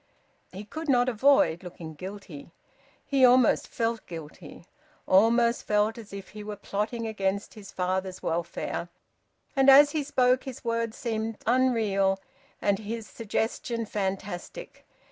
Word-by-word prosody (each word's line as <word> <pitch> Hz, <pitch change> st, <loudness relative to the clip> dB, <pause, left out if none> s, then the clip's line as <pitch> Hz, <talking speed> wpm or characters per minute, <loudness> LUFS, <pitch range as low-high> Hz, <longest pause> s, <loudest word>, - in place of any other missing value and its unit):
He 195 Hz, +3 st, -8 dB
could 315 Hz, +9 st, -7 dB
not 245 Hz, -2 st, +4 dB
avoid 230 Hz, -, +3 dB
looking 170 Hz, -3 st, -9 dB
guilty. 185 Hz, -3 st, -9 dB, 0.6 s
He 275 Hz, -2 st, +2 dB
almost 250 Hz, -1 st, +5 dB
felt 230 Hz, -1 st, -2 dB
guilty, 160 Hz, 0 st, -10 dB, 0.4 s
almost 235 Hz, +4 st, +4 dB
felt 210 Hz, +1 st, +2 dB
as 220 Hz, -, -12 dB
if 200 Hz, -1 st, -8 dB
he 210 Hz, 0 st, -9 dB
were 210 Hz, 0 st, -6 dB
plotting 215 Hz, +4 st, -3 dB
against 200 Hz, -2 st, -2 dB
his 210 Hz, -3 st, -11 dB
father's 185 Hz, 0 st, -2 dB
welfare. 170 Hz, +1 st, -3 dB, 0.7 s
And 270 Hz, 0 st, +5 dB
as 285 Hz, +2 st, +8 dB
he 305 Hz, -1 st, -1 dB
spoke 255 Hz, -2 st, +2 dB
his 260 Hz, -2 st, -8 dB
words 230 Hz, -1 st, -1 dB
seemed 225 Hz, -2 st, -3 dB
unreal 220 Hz, -6 st, +2 dB, 0.4 s
and 200 Hz, -1 st, +1 dB
his 220 Hz, +1 st, -5 dB
suggestion 230 Hz, +1 st, -3 dB
fantastic. 195 Hz, -, -5 dB
215 Hz, 130 wpm, -27 LUFS, 195-240 Hz, 0.7 s, as